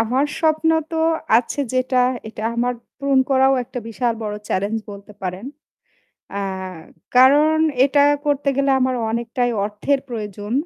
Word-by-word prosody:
আমার 250 +5 +1 0.2
স্বপ্ন 320 0 +2 0.2
তো 325 - -3 0.4
আছে 250 +4 -4
যেটা, 255 0 0 0.3
এটা 215 -1 -8
আমার 245 +1 0 0.2
পূরণ 275 -1 +2
করাও 265 0 +4
একটা 245 - -7
বিশাল 235 +1 -1
বড় 210 -1 -3
challenge 205 +4 -1
বলতে 200 +1 -11
পারেন। 185 +3 -4 0.9
আ - - -1 0.8
কারণ 290 +5 +6 0.3
এটা 285 +1 +3 0.2
করতে 285 -1 0
গেলে 275 0 +2
আমার 255 0 +1 0.2
অনেকটাই 235 +2 -1
অর্থের 215 +7 -1
প্রয়োজন। 210 -2 -6
250 Hz, 135 wpm, -20 LUFS, 220-275 Hz, 0.9 s, কারণ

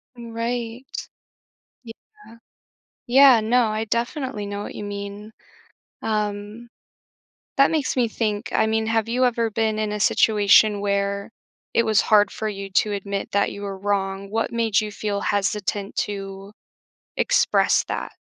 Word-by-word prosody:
M 235 -1 -10
right, 235 +1 -3 1.0
yeah 230 - -15 0.7
yeah, 260 -1 +7
no, 235 +2 +3
I 215 +1 -2
definitely 235 0 -3
know 200 0 -5
what - - -8
you 205 - -6
mean, 205 +1 -7 0.7
um, 210 +1 -3 0.9
that 275 0 +5
makes 300 -4 -1
me 240 -2 +2
think, 210 -2 -2
I - - +2
mean, 220 0 0
have 225 0 0
you 250 +2 +1
ever 235 -2 +1
been 220 0 0
in 215 -1 -1
a 210 - -3
situation 210 0 +4
where 200 0 -1 0.4
it 230 - +3
was 215 -2 +3
hard 210 -1 +4
for 220 - -5
you 195 -1 -5
to 210 +2 +2
admit 200 0 -4
that 200 0 +1
you 200 - -8
were 195 -1 -5
wrong? 195 0 -2
What 225 +2 -1
made 230 -3 +1
you 210 -1 -5
feel 205 -1 -3
hesitant 205 0 -1
to 195 0 -7 0.6
express - - +2
that? - - -4
215 Hz, 150 wpm, -23 LUFS, 200-230 Hz, 1.0 s, yeah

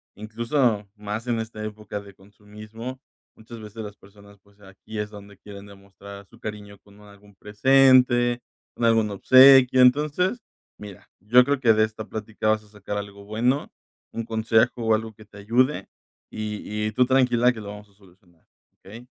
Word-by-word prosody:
incluso 110 0 -1
más 105 +3 -6
en 120 -2 -1
esta 110 -1 -7
época 105 -1 -7
de 100 -1 -14
consumismo. 105 +5 -11 0.3
Muchas 115 +1 -12
veces 110 +1 -9
las 105 -1 -10
personas, 100 +1 -19
pues, 100 0 -28
aquí 95 +2 -11
es 105 0 -4
donde 100 -1 -14
quieren 100 -1 -12
demostrar 100 0 -14
su 115 - -21
cariño 105 -2 -8
con 100 +1 -21
algún 100 0 -19
presente, 120 +2 +3 0.3
con 120 - -2
algún 115 -2 +2
obsequio. 130 +4 +6
Entonces, 150 - +2 0.4
mira, 105 -3 -13
yo 120 +6 +5
creo 140 0 -1
que 115 -4 +4
de 110 0 +2
esta 110 0 -5
plática 110 0 -5
vas 110 0 +1
a 105 - -22
sacar 105 0 -7
algo 100 0 -8
bueno, 120 +7 -1 0.4
un 115 - -4
consejo 115 +1 0
o 110 -1 +3
algo 110 0 -5
que 110 0 -17
te 105 -1 -15
ayude 125 +7 0 0.4
y 105 0 -5
y - - -3
tú 125 - +3
tranquila, 125 -2 +2
que 115 - -9
lo 105 - -9
vamos 105 0 -10
a 100 - -28
solucionar, 90 -3 -26 0.3
¿okey? 115 +5 -13
110 Hz, 170 wpm, -23 LUFS, 100-120 Hz, 0.4 s, obsequio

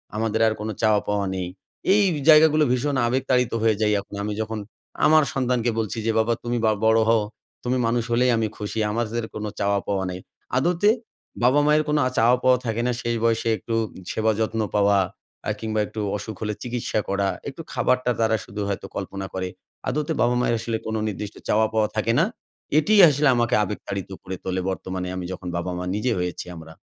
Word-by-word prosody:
আমাদের 110 0 0
আর 110 - +2
কোন 110 - -3
চাওয়া 110 -2 +4
পাওয়া 100 -1 0
নেই।" 90 -1 -3 0.5
এই 205 0 +5 0.3
জায়গাগুলো 155 0 +7
ভীষণ 135 +3 0
আবেগতাড়িত 125 -1 +1
হয়ে 110 -1 +3
যাই 105 -1 +3
এখন। 100 - -11
আমি 105 0 -2
যখন 110 0 -3 0.5
আমার 155 0 +6
সন্তানকে 125 -3 +1
বলছি 110 +1 -2
যে, 115 - +2
"বাবা 115 +1 +2
তুমি 120 0 -1
বা 110 - +4
বড় 110 0 +5
হও, 115 -2 +4 0.4
তুমি 125 +1 0
মানুষ 115 0 +1
হলেই 125 +1 +3
আমি 110 -1 +1
খুশি। 105 +1 -4
আমাদের 115 0 -2
কোন 110 - -5 0.2
চাওয়া 100 0 +2
পাওয়া 95 -1 0
নাই।" 90 - -5 0.4
আদতে 175 +8 +3 0.5
বাবা 130 +4 +5
মায়ের 150 +1 +4
কোন 150 0 +2
আ - - 0
চাওয়া 120 +3 +5
পাওয়া 130 0 +5
থাকে 115 0 -1
না। 125 - +2
শেষ 120 0 -1
বয়সে 115 0 +2
একটু 115 +4 -6 0.4
সেবা 110 0 +1
যত্ন 110 0 0
পাওয়া, 100 -1 +4 0.5
আ - - +1
কিংবা 110 -1 -2
একটু 110 - -5 0.2
অসুখ 110 +1 -7
হলে 105 0 -1
চিকিৎসা 120 -3 -2
করা, 100 0 +1 0.2
একটু 140 +4 -9
খাবারটা 125 -1 +1
তারা 110 -1 +3
শুধু 105 +2 -6
হয়তো 100 - -3
কল্পনা 95 0 -4
করে। 95 -1 -2 0.4
আদতে 150 +1 -1
বাবা 120 +1 +3
মায়ের 120 -1 +2
আসলে 115 -1 -2
কোন 110 - -2
নির্দিষ্ট 105 0 -5
চাওয়া-পাওয়া 110 0 +2
থাকে 110 +1 +1
না। - - +4 0.5
এটিই 205 +6 +5
আসলে 145 +1 +2
আমাকে 120 -1 +2
আবেগতাড়িত 100 -1 -5
করে 95 - -5
তোলে। 95 0 -1
বর্তমানে 95 -1 -4
আমি 90 -1 -4
যখন 90 - -8
বাবা-মা 90 +1 -3
নিজে 120 +4 0
হয়েছি 90 0 -3
আমরা। 80 -1 -11
110 Hz, 190 wpm, -24 LUFS, 105-125 Hz, 0.5 s, জায়গাগুলো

